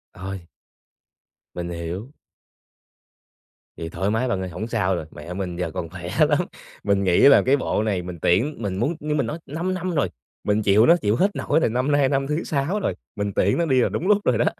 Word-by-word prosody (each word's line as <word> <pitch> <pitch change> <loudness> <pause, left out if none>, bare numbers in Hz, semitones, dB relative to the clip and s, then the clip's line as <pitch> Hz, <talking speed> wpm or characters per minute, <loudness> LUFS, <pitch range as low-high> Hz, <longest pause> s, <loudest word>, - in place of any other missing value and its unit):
Ôi! 95 -2 -7 1.1
Mình 85 0 -4
hiểu. 85 - -5 1.7
Thì 80 - -5
thoải 95 +4 -2
mái 115 +4 0
bạn 95 -6 -1
ơi, 95 - -4
hổng 90 +6 -5
sao 100 -6 0
rồi, 80 - -4
mẹ 85 +4 -8
mình 90 -2 -4
giờ 85 -2 -3
còn 85 - -5
khỏe - - -7 0.2
lắm. - - +3 0.4
Mình 100 -1 +2
nghĩ 90 -2 +3
là 140 - +8
cái 140 +2 +4
bộ 110 - -1
này 100 -4 0
mình 90 -2 -8
tiễn 120 - +2
mình 95 -3 -2
muốn 140 - 0
như 150 0 -2
mình 145 - +1
nói 160 - -4
5 170 +6 -3
năm 185 0 -3
rồi 135 -11 +1 0.3
mình 105 +1 +1
chịu 105 +3 +5
nó, 170 - +7
chịu 105 -7 +1
hết 195 - +1
nổi - - +1
rồi, 140 - +2
năm 125 +5 0
nay 145 -2 +3
năm 135 -1 0
thứ 150 +3 -1
6 155 +8 -1
rồi, - - -1 0.2
mình 100 -1 -2
tiễn 100 - +2
nó 170 - +1
đi 130 -5 +3
là - - +2
đúng 180 - -3
lúc 210 - +6
rồi - - +3
đó. - - +2
110 Hz, 225 wpm, -23 LUFS, 90-145 Hz, 1.7 s, là